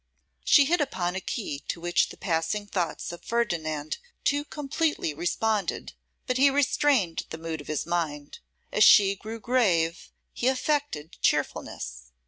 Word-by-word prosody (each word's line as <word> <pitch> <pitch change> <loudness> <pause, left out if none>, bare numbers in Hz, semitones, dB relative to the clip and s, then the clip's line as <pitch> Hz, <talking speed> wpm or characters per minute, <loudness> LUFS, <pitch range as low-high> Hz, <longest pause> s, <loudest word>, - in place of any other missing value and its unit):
She 285 - +6
hit 345 +3 +2
upon 185 -10 -1
a 190 - -3
key 185 - -4
to - - -3
which 175 +1 +1
the - - -11
passing 170 +4 -1
thoughts 180 -5 -3
of 175 - -10
Ferdinand 155 -10 -2 0.2
too 285 +1 +1
completely 295 - -1
responded, 205 +6 -1 0.3
but 250 -1 0
he 280 +1 +7
restrained 275 - +1
the 160 - -6
mood 160 -1 -5
of - - -14
his 155 -2 -2
mind. 155 -4 -3 0.3
As 210 - +4
she 200 -1 +7
grew 220 +3 -7
grave, 190 -9 +1 0.2
he 240 - -1
affected 265 - -1
cheerfulness. 60 +1 -1
190 Hz, 145 wpm, -27 LUFS, 165-255 Hz, 0.3 s, he